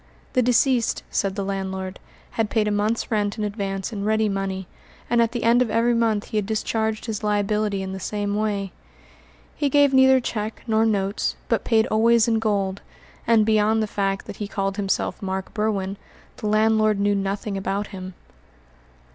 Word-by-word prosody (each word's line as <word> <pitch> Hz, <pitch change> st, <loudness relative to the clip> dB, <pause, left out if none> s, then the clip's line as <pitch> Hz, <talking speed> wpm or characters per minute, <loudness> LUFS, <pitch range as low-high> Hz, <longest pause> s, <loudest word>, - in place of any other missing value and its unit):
The 255 Hz, -, +3 dB
deceased, 245 Hz, 0 st, +2 dB
said 195 Hz, -1 st, 0 dB
the 200 Hz, -1 st, -2 dB
landlord, 190 Hz, -1 st, -4 dB, 0.3 s
had 225 Hz, -2 st, -1 dB
paid 215 Hz, -1 st, +1 dB
a -, -, +1 dB
month's 210 Hz, +3 st, 0 dB
rent 205 Hz, -1 st, 0 dB
in 215 Hz, -, -2 dB
advance 200 Hz, 0 st, -3 dB
in 200 Hz, -2 st, -4 dB
ready 220 Hz, +1 st, +2 dB
money, 195 Hz, -1 st, -2 dB, 0.5 s
and 235 Hz, -1 st, +4 dB
at 230 Hz, 0 st, +2 dB
the 240 Hz, -1 st, -3 dB
end 235 Hz, +2 st, +4 dB
of 250 Hz, -, +1 dB
every 235 Hz, +2 st, +2 dB
month 225 Hz, -3 st, +1 dB
he 215 Hz, -, -2 dB
had 205 Hz, -2 st, 0 dB
discharged 220 Hz, 0 st, -1 dB
his 220 Hz, -2 st, -4 dB
liability 210 Hz, -1 st, 0 dB
in 190 Hz, -, -5 dB
the 190 Hz, -, -5 dB
same 205 Hz, +1 st, -2 dB
way. 205 Hz, -2 st, -1 dB, 0.8 s
He 290 Hz, -, 0 dB
gave 285 Hz, 0 st, +4 dB
neither 265 Hz, 0 st, +6 dB
cheque 220 Hz, -3 st, -4 dB
nor 225 Hz, -1 st, +2 dB
notes, 200 Hz, -2 st, 0 dB
but -, -, +1 dB
paid 220 Hz, -2 st, +3 dB
always 230 Hz, +1 st, +4 dB
in 225 Hz, -1 st, +2 dB
gold; 200 Hz, -3 st, -1 dB, 0.5 s
and 225 Hz, -2 st, +5 dB
beyond 220 Hz, 0 st, +3 dB
the -, -, +1 dB
fact 195 Hz, -2 st, -2 dB
that -, -, -8 dB
he 205 Hz, -, -4 dB
called 195 Hz, 0 st, -2 dB
himself 195 Hz, -2 st, -1 dB
Mark 190 Hz, -1 st, -4 dB
Berwin, 200 Hz, -3 st, -1 dB, 0.4 s
the 215 Hz, -, -4 dB
landlord 215 Hz, 0 st, +3 dB
knew 205 Hz, 0 st, +2 dB
nothing 200 Hz, +1 st, -2 dB
about 195 Hz, +1 st, -2 dB
him. 185 Hz, -1 st, -7 dB
210 Hz, 180 wpm, -23 LUFS, 195-225 Hz, 0.8 s, neither